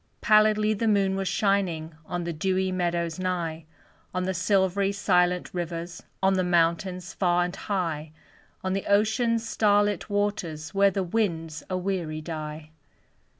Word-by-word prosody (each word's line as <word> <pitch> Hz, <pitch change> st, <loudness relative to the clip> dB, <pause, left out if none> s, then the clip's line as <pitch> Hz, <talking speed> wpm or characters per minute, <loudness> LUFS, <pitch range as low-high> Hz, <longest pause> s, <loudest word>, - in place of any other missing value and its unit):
Pallidly 215 Hz, 0 st, +4 dB
the 225 Hz, +2 st, -1 dB
moon 200 Hz, -2 st, +2 dB
was 195 Hz, 0 st, -2 dB
shining 180 Hz, -7 st, 0 dB
On 175 Hz, -1 st, -3 dB
the 170 Hz, 0 st, -3 dB
dewy 185 Hz, +3 st, 0 dB
meadows 170 Hz, -2 st, -1 dB
nigh; 170 Hz, -3 st, -2 dB, 0.5 s
On 185 Hz, -, 0 dB
the 190 Hz, +1 st, -1 dB
silvery, 195 Hz, +1 st, +2 dB
silent 180 Hz, -3 st, +1 dB
rivers, 170 Hz, -1 st, -4 dB, 0.2 s
On 190 Hz, 0 st, +4 dB
the 185 Hz, -1 st, +1 dB
mountains 180 Hz, +2 st, +1 dB
far 175 Hz, -2 st, +2 dB
and 180 Hz, -, -5 dB
high 165 Hz, -6 st, -3 dB, 0.5 s
On 185 Hz, 0 st, -1 dB
the 195 Hz, -, -3 dB
ocean's 225 Hz, +3 st, +2 dB
star 205 Hz, -2 st, +3 dB
lit 205 Hz, -2 st, -2 dB
waters, 190 Hz, -6 st, -2 dB
Where 200 Hz, 0 st, +5 dB
the 195 Hz, 0 st, -1 dB
winds 165 Hz, -6 st, -1 dB
a 185 Hz, -, -1 dB
weary 180 Hz, -4 st, -2 dB
die. 155 Hz, -1 st, -6 dB
185 Hz, 150 wpm, -26 LUFS, 170-200 Hz, 0.5 s, Where